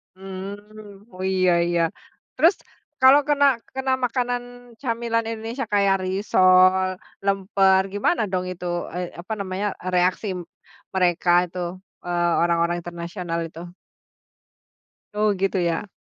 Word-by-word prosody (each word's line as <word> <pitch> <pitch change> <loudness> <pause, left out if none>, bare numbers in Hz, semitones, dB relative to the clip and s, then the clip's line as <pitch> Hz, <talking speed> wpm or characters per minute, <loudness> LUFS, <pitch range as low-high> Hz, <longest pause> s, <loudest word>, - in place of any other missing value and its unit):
Mmm, 205 +2 -10
oh 185 +1 -7
iya 185 -1 +2 0.2
iya. 175 -1 +1 0.5
Terus 335 +5 +5 0.5
kalau 265 +2 +8
kena 285 -1 +3 0.3
kena 265 0 -1
makanan 245 0 -1 0.4
camilan 230 -2 -1
Indonesia 230 +4 -4
kayak 200 -1 +4
risol, 185 -1 +4 0.4
lemper, 195 -1 +3
gimana 205 +10 +1
dong 185 -1 -1
itu 180 0 -8 0.3
ay 180 - -3 0.2
apa 205 +5 -5
namanya, 195 +1 -2 0.3
reaksi 180 +4 +1 0.7
mereka 180 -1 +1 0.2
itu, 180 - -7 0.5
eee, 175 -1 +1
orang-orang 170 0 +1
internasional 170 0 -5
itu? 165 +2 -10 1.5
Oh, 210 0 +2
gitu 195 0 +1
ya? 170 +4 -1
190 Hz, 110 wpm, -23 LUFS, 180-215 Hz, 1.5 s, kalau